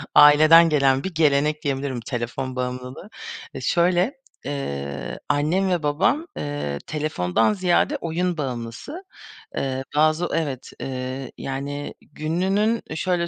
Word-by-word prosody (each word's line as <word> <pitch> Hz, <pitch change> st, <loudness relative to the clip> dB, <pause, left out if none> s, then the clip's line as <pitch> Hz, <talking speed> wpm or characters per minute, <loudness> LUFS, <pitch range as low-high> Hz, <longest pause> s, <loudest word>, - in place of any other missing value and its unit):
aileden 155 Hz, +3 st, +8 dB
gelen 135 Hz, -3 st, +3 dB
bir 190 Hz, -, -4 dB
gelenek 150 Hz, -1 st, +2 dB
diyebilirim 135 Hz, -3 st, -2 dB
telefon 125 Hz, +2 st, -4 dB
bağımlılığı. 125 Hz, +7 st, -5 dB, 0.5 s
Eee, -, -, -5 dB
şöyle, 180 Hz, +6 st, +2 dB, 0.3 s
eee, 70 Hz, -, -4 dB
annem 155 Hz, +7 st, +2 dB
ve 175 Hz, -3 st, 0 dB
babam, 245 Hz, -, +1 dB
eee, 145 Hz, -, -3 dB
telefondan 130 Hz, -, +1 dB
ziyade 185 Hz, -3 st, +2 dB
oyun 175 Hz, +1 st, -1 dB
bağımlısı. 130 Hz, -, -5 dB, 0.5 s
Eee, 135 Hz, -1 st, -2 dB
bazı 155 Hz, +3 st, +3 dB
Evet, 140 Hz, -6 st, -2 dB
eee, 130 Hz, 0 st, -4 dB
yani 140 Hz, +2 st, -4 dB
gününün 195 Hz, +8 st, 0 dB
eee, 155 Hz, -, -5 dB
şöyle 175 Hz, 0 st, 0 dB
145 Hz, 120 wpm, -23 LUFS, 130-170 Hz, 0.5 s, aileden